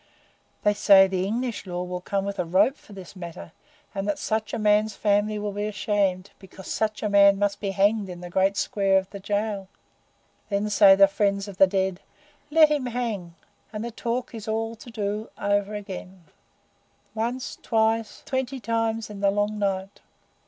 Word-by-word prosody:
They 210 Hz, -, +4 dB
say 200 Hz, -1 st, +7 dB
the 190 Hz, 0 st, -1 dB
English 230 Hz, -1 st, -3 dB
Law 180 Hz, 0 st, -3 dB
will 180 Hz, 0 st, -5 dB
come 195 Hz, +2 st, -2 dB
with 200 Hz, -1 st, -4 dB
a -, -, +2 dB
rope 185 Hz, +10 st, +3 dB
for 215 Hz, -, -19 dB
this 190 Hz, -1 st, -11 dB
matter, 170 Hz, -, -9 dB, 0.4 s
and 195 Hz, 0 st, -3 dB
that 205 Hz, -, 0 dB
such 220 Hz, -1 st, -2 dB
a -, -, -2 dB
man's 210 Hz, 0 st, +2 dB
family 210 Hz, +1 st, +1 dB
will 210 Hz, 0 st, -3 dB
be 205 Hz, +1 st, -3 dB
ashamed, 200 Hz, -3 st, -1 dB
because 190 Hz, 0 st, -13 dB
such 215 Hz, 0 st, -2 dB
a -, -, +1 dB
man 200 Hz, -1 st, +6 dB
must 205 Hz, 0 st, 0 dB
be 200 Hz, -, -2 dB
hanged 200 Hz, +1 st, +1 dB
in 175 Hz, -1 st, -7 dB
the 175 Hz, 0 st, -8 dB
great 190 Hz, +2 st, +2 dB
square 195 Hz, -1 st, +2 dB
of 190 Hz, 0 st, -2 dB
the 200 Hz, -, -7 dB
Jail. 205 Hz, 0 st, -2 dB, 0.8 s
Then 205 Hz, +1 st, -1 dB
say 200 Hz, -1 st, +7 dB
the 195 Hz, 0 st, +7 dB
friends 200 Hz, 0 st, 0 dB
of 200 Hz, -2 st, -9 dB
the 195 Hz, -, +7 dB
dead, 190 Hz, -1 st, -1 dB, 0.5 s
'Let 310 Hz, 0 st, +6 dB
him 290 Hz, -4 st, 0 dB
hang!' 220 Hz, -8 st, -4 dB, 0.4 s
and 215 Hz, 0 st, -5 dB
the 235 Hz, -, -5 dB
talk 235 Hz, +3 st, -3 dB
is 225 Hz, -2 st, -8 dB
all 225 Hz, +1 st, -2 dB
to 235 Hz, -, -13 dB
do 210 Hz, -1 st, -3 dB
over 205 Hz, +1 st, 0 dB
again 190 Hz, -3 st, -8 dB, 0.9 s
once, 235 Hz, +3 st, -3 dB
twice, 225 Hz, 0 st, 0 dB
twenty 260 Hz, 0 st, -2 dB
times 225 Hz, 0 st, -1 dB
in 205 Hz, -, -8 dB
the 200 Hz, 0 st, +3 dB
long 205 Hz, +1 st, -1 dB
night. 195 Hz, -1 st, -2 dB
205 Hz, 185 wpm, -25 LUFS, 195-220 Hz, 0.9 s, say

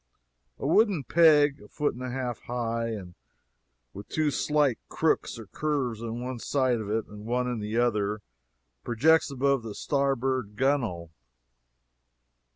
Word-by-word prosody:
A -, -, -6 dB
wooden 190 Hz, 0 st, +3 dB
peg, 150 Hz, -2 st, +5 dB
a 105 Hz, -, -13 dB
foot 150 Hz, +6 st, -1 dB
and 125 Hz, -, -10 dB
a 130 Hz, -, -4 dB
half 125 Hz, -2 st, -3 dB
high, 115 Hz, -2 st, -2 dB, 0.9 s
with 100 Hz, +1 st, -10 dB
two 155 Hz, -2 st, +1 dB
slight 145 Hz, -3 st, +1 dB
crooks -, -, 0 dB
or 115 Hz, -, -9 dB
curves 130 Hz, -2 st, -2 dB
in 115 Hz, +1 st, -4 dB
one 125 Hz, -1 st, -4 dB
side 130 Hz, -3 st, +1 dB
of 105 Hz, -, -6 dB
it 110 Hz, +1 st, 0 dB
and 105 Hz, 0 st, -11 dB
one 125 Hz, +2 st, -1 dB
in 120 Hz, -2 st, -2 dB
the 105 Hz, +2 st, -3 dB
other, 105 Hz, -3 st, +1 dB, 0.6 s
projects 155 Hz, +8 st, +3 dB
above 140 Hz, -1 st, +1 dB
the 110 Hz, -3 st, -7 dB
starboard 135 Hz, -5 st, 0 dB
gunwale. 115 Hz, -, 0 dB
125 Hz, 145 wpm, -27 LUFS, 115-140 Hz, 0.9 s, peg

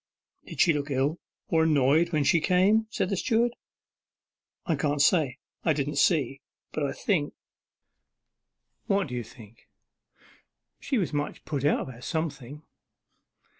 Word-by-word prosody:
'Did -, -, -9 dB
she 170 Hz, -, +5 dB
look 145 Hz, 0 st, -3 dB
ill, 140 Hz, +4 st, 0 dB, 0.3 s
or 160 Hz, -, +3 dB
annoyed, 155 Hz, +1 st, +3 dB
when 150 Hz, -3 st, +1 dB
she 165 Hz, +4 st, +4 dB
came?' 195 Hz, +6 st, +3 dB
said 185 Hz, -, -1 dB
the -, -, +1 dB
steward. 235 Hz, +4 st, +1 dB, 1.1 s
'I 165 Hz, -, +1 dB
can't 145 Hz, 0 st, 0 dB
say. 140 Hz, -4 st, +3 dB, 0.3 s
I 160 Hz, -, +3 dB
didn't 145 Hz, 0 st, -2 dB
see; 140 Hz, -3 st, +2 dB, 0.3 s
but 155 Hz, -, -2 dB
I 140 Hz, -, 0 dB
think 160 Hz, -8 st, -1 dB, 0.8 s
' -, -, -54 dB
'What 195 Hz, -6 st, +1 dB
do -, -, -7 dB
you 120 Hz, -1 st, -3 dB
think?' 110 Hz, 0 st, -16 dB, 1.1 s
'She 270 Hz, -, -1 dB
was 180 Hz, -7 st, -1 dB
much 145 Hz, 0 st, -3 dB
put 140 Hz, -3 st, -3 dB
out 145 Hz, -, +2 dB
about 125 Hz, -2 st, -8 dB
something. 150 Hz, -3 st, -4 dB
150 Hz, 145 wpm, -27 LUFS, 140-175 Hz, 1.1 s, she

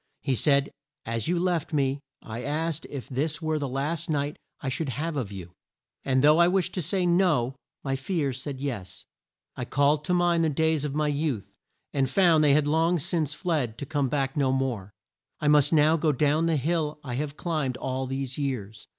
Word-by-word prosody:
He 135 Hz, -, +1 dB
said, 140 Hz, +2 st, +3 dB, 0.3 s
"As 115 Hz, -1 st, -2 dB
you 175 Hz, +1 st, +1 dB
left 175 Hz, -3 st, 0 dB
me, 140 Hz, -1 st, +1 dB, 0.2 s
I 115 Hz, +2 st, -6 dB
asked 155 Hz, +3 st, -2 dB
if 130 Hz, -6 st, -6 dB
this 150 Hz, +4 st, -1 dB
were 155 Hz, -1 st, -1 dB
the 140 Hz, -, -2 dB
last 150 Hz, +6 st, -2 dB
sight 145 Hz, -3 st, -1 dB, 0.2 s
I 135 Hz, -, -6 dB
should 135 Hz, +3 st, -1 dB
have 155 Hz, +5 st, -3 dB
of 120 Hz, -8 st, -3 dB
you. 90 Hz, -3 st, -8 dB, 0.5 s
And 130 Hz, 0 st, +2 dB
though 150 Hz, +2 st, +6 dB
I 170 Hz, -, +7 dB
wished 185 Hz, 0 st, +1 dB
to 185 Hz, -, -1 dB
say 180 Hz, +3 st, 0 dB
'No,' 175 Hz, -8 st, +2 dB, 0.3 s
my 135 Hz, -1 st, -1 dB
fears 135 Hz, -3 st, -2 dB
said 135 Hz, -1 st, -5 dB
'Yes.' 120 Hz, -10 st, -5 dB, 0.5 s
I -, -, -4 dB
called 145 Hz, +1 st, +2 dB
to 180 Hz, -, +1 dB
mind 175 Hz, -1 st, +3 dB
the 160 Hz, -, +3 dB
days 160 Hz, 0 st, +1 dB
of 145 Hz, -1 st, -3 dB
my 150 Hz, 0 st, +1 dB
youth 145 Hz, -7 st, -2 dB, 0.4 s
and 135 Hz, -2 st, +1 dB
found 165 Hz, -1 st, +4 dB
they 145 Hz, -2 st, +5 dB
had 150 Hz, -1 st, +3 dB
long 165 Hz, +4 st, +2 dB
since 155 Hz, -2 st, -1 dB
fled 150 Hz, -, -1 dB
to 140 Hz, -, -5 dB
come 140 Hz, -1 st, 0 dB
back 135 Hz, +1 st, -1 dB
no 135 Hz, -3 st, +2 dB
more. 125 Hz, -7 st, -2 dB, 0.5 s
I 150 Hz, -, -1 dB
must 145 Hz, -1 st, +5 dB
now 155 Hz, 0 st, +5 dB
go 155 Hz, 0 st, +2 dB
down 150 Hz, +4 st, +2 dB
the 165 Hz, -2 st, +2 dB
hill 155 Hz, +1 st, -1 dB
I 130 Hz, -4 st, -5 dB
have 145 Hz, +3 st, -3 dB
climbed 150 Hz, -7 st, -1 dB
all 130 Hz, 0 st, -3 dB
these 135 Hz, +1 st, -4 dB
years. 115 Hz, -7 st, -4 dB
145 Hz, 200 wpm, -27 LUFS, 135-160 Hz, 0.5 s, I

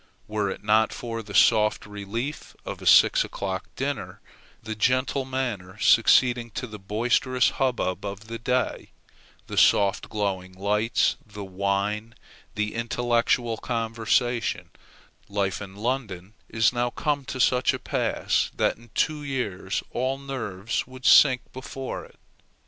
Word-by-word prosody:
Were 105 Hz, -2 st, -1 dB
it -, -, -6 dB
not 110 Hz, +1 st, +3 dB
for 115 Hz, -1 st, -5 dB
the 100 Hz, -2 st, -9 dB
soft 105 Hz, -2 st, +4 dB
relief 105 Hz, +8 st, -5 dB
of -, -, -6 dB
a -, -, -4 dB
six -, -, +6 dB
o'clock -, -, -4 dB
dinner, -, -, -4 dB, 0.4 s
the 110 Hz, 0 st, -4 dB
gentle 130 Hz, +4 st, +1 dB
manner 120 Hz, -8 st, -4 dB
succeeding 120 Hz, +2 st, +4 dB
to -, -, -2 dB
the 105 Hz, -3 st, -9 dB
boisterous 120 Hz, +5 st, +1 dB
hubbub 120 Hz, -8 st, 0 dB
of 100 Hz, +1 st, -6 dB
the 115 Hz, +1 st, -6 dB
day, 125 Hz, +2 st, -1 dB, 0.6 s
the -, -, -7 dB
soft 100 Hz, -1 st, +3 dB
glowing 95 Hz, -3 st, -2 dB
lights, 105 Hz, +4 st, +1 dB
the 105 Hz, -1 st, -9 dB
wine, 100 Hz, +3 st, -2 dB, 0.4 s
the 105 Hz, 0 st, -1 dB
intellectual 115 Hz, 0 st, 0 dB
conversation, 115 Hz, +1 st, -1 dB, 0.6 s
life 100 Hz, -1 st, -1 dB
in 95 Hz, -1 st, -8 dB
London 105 Hz, -4 st, -3 dB, 0.2 s
is 115 Hz, +2 st, +2 dB
now 120 Hz, 0 st, 0 dB
come 145 Hz, +2 st, -1 dB
to 130 Hz, -, -5 dB
such 125 Hz, 0 st, +3 dB
a -, -, -3 dB
pass, -, -, 0 dB
that -, -, +1 dB
in 120 Hz, +1 st, -18 dB
two 155 Hz, -2 st, +1 dB
years 110 Hz, -8 st, -3 dB
all 130 Hz, +2 st, -1 dB
nerves 120 Hz, -7 st, -4 dB
would 130 Hz, 0 st, -12 dB
sink 130 Hz, -2 st, +7 dB
before 130 Hz, 0 st, -6 dB
it. -, -, -20 dB
115 Hz, 140 wpm, -25 LUFS, 105-125 Hz, 0.6 s, sink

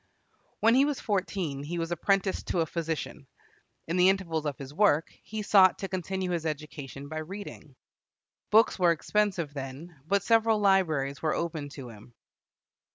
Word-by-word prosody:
When 225 Hz, +1 st, +5 dB
he 265 Hz, +2 st, +5 dB
was 290 Hz, -1 st, -1 dB
fourteen, 185 Hz, -8 st, -2 dB
he 160 Hz, +5 st, -5 dB
was 165 Hz, 0 st, -3 dB
apprenticed 190 Hz, +3 st, 0 dB
to 175 Hz, -, 0 dB
a -, -, +1 dB
physician. 165 Hz, -1 st, -4 dB, 0.6 s
In 170 Hz, +3 st, -1 dB
the 180 Hz, +1 st, +6 dB
intervals 165 Hz, -5 st, -1 dB
of 145 Hz, -, -3 dB
his 135 Hz, 0 st, -9 dB
work, 165 Hz, -4 st, +3 dB
he 215 Hz, -1 st, -5 dB
sought 190 Hz, -3 st, +6 dB
to 195 Hz, -, -4 dB
continue 185 Hz, 0 st, -3 dB
his 170 Hz, -2 st, -1 dB
education 145 Hz, -2 st, -6 dB
by 155 Hz, +2 st, -5 dB
reading. 160 Hz, -4 st, -9 dB, 0.7 s
Books 220 Hz, -1 st, +4 dB
were 175 Hz, -2 st, +5 dB
expensive 180 Hz, -3 st, -1 dB
then, 140 Hz, +3 st, -8 dB
but 200 Hz, +2 st, +2 dB
several 225 Hz, 0 st, +3 dB
libraries 165 Hz, -9 st, +2 dB
were 155 Hz, -1 st, 0 dB
open 160 Hz, -4 st, -3 dB
to 130 Hz, -3 st, -7 dB
him. 115 Hz, +2 st, -14 dB
170 Hz, 160 wpm, -28 LUFS, 150-195 Hz, 0.7 s, the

